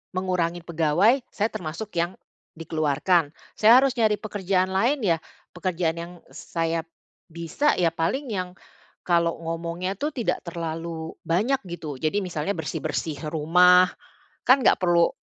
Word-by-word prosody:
mengurangi 180 -2 -1
pegawai, 170 - +2
saya 215 +2 0
termasuk 175 +6 -6
yang 170 +2 0 0.4
dikeluarkan. 155 0 +1 0.3
Saya 225 +4 +7
harus 275 -1 +1
nyari 215 -2 +3
pekerjaan 190 -3 -1
lain 240 +9 +1
ya, 170 -5 +3 0.4
pekerjaan 175 -2 -1
yang 170 +1 -7 0.2
saya 165 -1 -2 0.5
bisa 170 - 0
ya 170 -2 +4
paling 255 - -1
yang 180 -3 -3 0.5
kalau 170 -1 +2
ngomongnya 170 +3 -3
tuh 300 +2 -1
tidak 240 -5 -1
terlalu 165 -1 -5
banyak 220 +11 +1
gitu, 165 -4 -6
jadi 155 +8 0
misalnya 175 +1 -2
bersih-bersih 155 -1 -3
rumah, 180 +4 +5 0.6
kan 260 +2 +6
nggak - - +5
perlu 175 -2 +4
175 Hz, 130 wpm, -25 LUFS, 165-195 Hz, 0.6 s, Saya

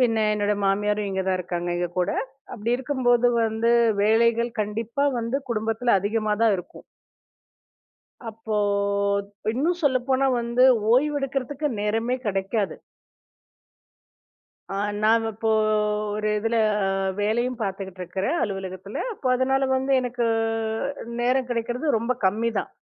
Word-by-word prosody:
பின்ன 230 -3 +3 0.2
என்னோட 210 0 +1
மாமியாரும் 205 +1 +1
இங்க 190 0 -1
தான் 185 -1 +1
இருக்காங்க, 175 -1 -4
எங்க 175 0 -1
கூட. 180 - +1 0.4
அப்படி 230 +2 -1
இருக்கும்போது 250 -2 +2 0.2
வந்து, 225 +1 +1 0.3
வேலைகள் 230 +2 +3
கண்டிப்பா 225 +6 -1
வந்து 235 +3 -1
குடும்பத்துல 225 +2 +1
அதிகமா 215 +1 0
தான் 225 -3 +4
இருக்கும். 180 - -11 1.5
அப்போ 220 0 -5 1.0
இன்னும் 320 +9 0
சொல்லப்போனா 260 0 +2
வந்து, 235 +1 +2 0.3
ஓய்வெடுக்கறதுக்கு 280 +1 0
நேரமே 225 +4 0
கிடைக்காது. 195 +1 -1 1.9
அ - - -5 0.3
நான் 225 +1 +4
இப்போ, 220 +1 -2 0.7
ஒரு 215 0 -2
இதுல 225 +2 0 0.6
வேலையும் 240 +4 0
பாத்துகிட்டு 190 -2 -4
இருக்கிறன் 190 - -2
அலுவலகத்துல. 195 -1 -5
அப்போ 295 -10 -4
அதுனால 265 +1 +1
வந்து, 265 +1 -1
எனக்கு 245 -1 -2 1.0
நேரம் 255 +1 +1
கிடைக்குறது 240 +4 -1
ரொம்ப 235 +3 0
கம்மி 220 +5 +1
தான். - - -6
230 Hz, 115 wpm, -24 LUFS, 210-250 Hz, 1.9 s, தான்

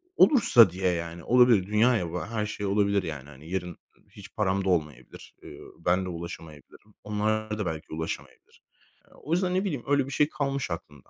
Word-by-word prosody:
olursa 120 - +6
diye 90 +1 -1
yani 85 -1 -5
olabilir. 120 -6 +4
Dünya 115 +4 +3
ya 85 -5 -3
bu 90 - -4
her 110 -1 -3
şey 105 -1 -5
olabilir 100 0 +1
yani 75 -4 -7
hani 75 +3 -13
yarın, 90 -1 -2 0.3
ııı, - - -30
hiç - - -14
param 95 -2 0
da 95 - +1
olmayabilir. 75 -5 -3
Eee, - - -11 0.3
ben 90 +1 +2
de - - -5
ulaşamayabilirim. 85 +3 -10
Onlar 110 +1 -1
da 105 - -1
belki 80 -2 -5
ulaşamayabilir. 80 +1 -7 0.5
Eee, - - -23
o 155 - -5
yüzden 180 +1 +1
ne 185 - +1
bileyim 150 - -3
öyle 140 -1 +2
bir 135 - -8
şey 150 +2 +2
kalmış 140 - -3
aklımda. 75 -4 -8
100 Hz, 195 wpm, -27 LUFS, 85-120 Hz, 0.5 s, olursa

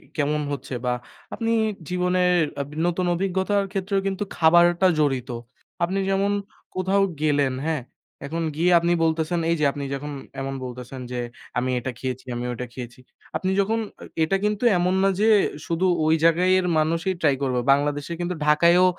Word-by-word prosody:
কেমন 150 0 0
হচ্ছে 140 - -6
বা 125 - +1 0.4
আপনি 225 -1 -2 0.4
জীবনের 180 0 +2 0.2
আব 140 - -5 0.2
নতুন 175 +1 0
অভিজ্ঞতার 190 +2 0
ক্ষেত্রেও 195 0 -1
কিন্তু 195 +1 -2
খাবারটা 175 +2 +5
জড়িত। 135 -4 +1 0.5
আপনি 190 +3 0
যেমন 195 +1 +1 0.4
কোথাও 190 +2 +2 0.2
গেলেন, 145 -3 +2
হ্যাঁ? 160 -3 0 0.4
এখন 165 +4 -3
গিয়ে 170 +3 +2
আপনি 170 +1 0
বলতেছেন, 160 +1 +1
এই 170 - +3
যে 150 - +2
আপনি 145 0 -6
যখন 145 +2 -5 0.3
এমন 135 0 -3
বলতেছেন 125 +1 -7
যে 125 - -3 0.4
আমি 125 +1 0
এটা 130 +2 -4
খেয়েছি, 130 0 -4
আমি 120 +1 -3
ওটা 125 +1 -5
খেয়েছি। 120 0 -8 0.4
আপনি 185 - 0
যখন 220 +3 +1 0.4
এ - - +2
এটা 195 +5 +2
কিন্তু 210 +2 -1
এমন 180 +1 +1
না - - +5
যে 215 - +3 0.4
শুধু 170 +2 0 0.2
ওই 160 +1 +4
জায়গায় 170 +3 +4
এর 185 - -1
মানুষই 165 +4 0
ট্রাই 145 -4 +3
করবে। 130 -2 0
বাংলাদেশে 145 +3 +1
কিন্তু 175 +1 -2
ঢাকায়ও 170 +4 +5
165 Hz, 165 wpm, -24 LUFS, 140-185 Hz, 0.5 s, খাবারটা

